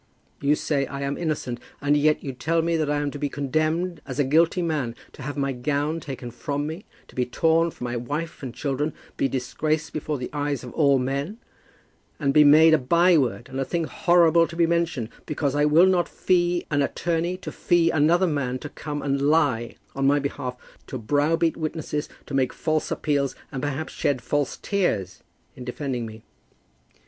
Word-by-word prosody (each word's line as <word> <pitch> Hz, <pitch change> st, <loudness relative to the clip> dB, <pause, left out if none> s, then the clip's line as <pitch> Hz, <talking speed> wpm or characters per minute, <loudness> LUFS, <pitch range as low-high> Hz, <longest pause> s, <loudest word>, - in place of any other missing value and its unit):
You 145 Hz, +1 st, +3 dB
say 140 Hz, -2 st, -1 dB
I 140 Hz, 0 st, -6 dB
am 140 Hz, 0 st, -1 dB
innocent, 150 Hz, -7 st, -2 dB, 0.2 s
and 145 Hz, +1 st, +2 dB
yet 150 Hz, +1 st, +2 dB
you 135 Hz, -, -4 dB
tell 160 Hz, +6 st, 0 dB
me 170 Hz, 0 st, +1 dB
I 150 Hz, -1 st, 0 dB
am 145 Hz, -1 st, -1 dB
to 145 Hz, -, -7 dB
be 145 Hz, -, -1 dB
condemned 155 Hz, +5 st, -1 dB
as 130 Hz, -2 st, -5 dB
a 145 Hz, -, +3 dB
guilty 165 Hz, +6 st, +3 dB
man, 145 Hz, -8 st, -1 dB, 0.2 s
have 145 Hz, 0 st, -5 dB
my 140 Hz, -1 st, 0 dB
gown 145 Hz, +5 st, -1 dB
taken 130 Hz, -5 st, -7 dB
from 145 Hz, +4 st, -3 dB
me, 160 Hz, +6 st, -6 dB, 0.3 s
be 125 Hz, -, 0 dB
torn 165 Hz, +6 st, +2 dB
from 125 Hz, -, -7 dB
my 120 Hz, 0 st, -3 dB
wife 145 Hz, +7 st, -4 dB
and 130 Hz, -3 st, -5 dB
children, 140 Hz, +4 st, -2 dB, 0.2 s
be -, -, +1 dB
disgraced 150 Hz, +5 st, -2 dB
before 155 Hz, -1 st, -2 dB
the 125 Hz, -, -6 dB
eyes 145 Hz, -2 st, -2 dB
of 125 Hz, -, -8 dB
all 140 Hz, -4 st, +4 dB
men, 140 Hz, -, -2 dB, 0.8 s
and 140 Hz, -3 st, +1 dB
be 150 Hz, -, +7 dB
made 155 Hz, +2 st, +7 dB
a 155 Hz, -, +5 dB
byword 150 Hz, -4 st, +3 dB
and 135 Hz, -, -5 dB
a -, -, +1 dB
thing 170 Hz, +4 st, -1 dB
horrible 170 Hz, 0 st, +4 dB
to 170 Hz, -, -9 dB
be 170 Hz, 0 st, +4 dB
mentioned, 165 Hz, -8 st, 0 dB, 0.2 s
because 145 Hz, -2 st, -1 dB
I 145 Hz, 0 st, +3 dB
will 155 Hz, +4 st, +6 dB
not 180 Hz, -2 st, +2 dB
fee 175 Hz, -1 st, +1 dB
an 145 Hz, -1 st, +2 dB
attorney 170 Hz, +5 st, -1 dB
to 185 Hz, -, -7 dB
fee 170 Hz, -2 st, +2 dB
another 165 Hz, +4 st, +3 dB
man 140 Hz, -6 st, -1 dB
to 150 Hz, -, -8 dB
come 145 Hz, 0 st, -5 dB
and 140 Hz, -1 st, 0 dB
lie 140 Hz, -6 st, +2 dB, 0.2 s
on 135 Hz, 0 st, +1 dB
my 145 Hz, +1 st, +4 dB
behalf, 140 Hz, -3 st, -3 dB, 0.3 s
to 130 Hz, -, -5 dB
browbeat 150 Hz, +8 st, +1 dB
witnesses, 155 Hz, -2 st, -3 dB, 0.2 s
to 145 Hz, -, -9 dB
make 130 Hz, -2 st, +1 dB
false 155 Hz, -1 st, -1 dB
appeals, 140 Hz, -3 st, 0 dB, 0.2 s
and 135 Hz, -, -4 dB
perhaps 145 Hz, +2 st, -3 dB
shed 140 Hz, -3 st, 0 dB
false 145 Hz, +3 st, -1 dB
tears 110 Hz, -, -1 dB, 0.3 s
in 125 Hz, -, -8 dB
defending 125 Hz, -2 st, -3 dB
me. 110 Hz, 0 st, -11 dB
145 Hz, 190 wpm, -24 LUFS, 135-160 Hz, 0.8 s, be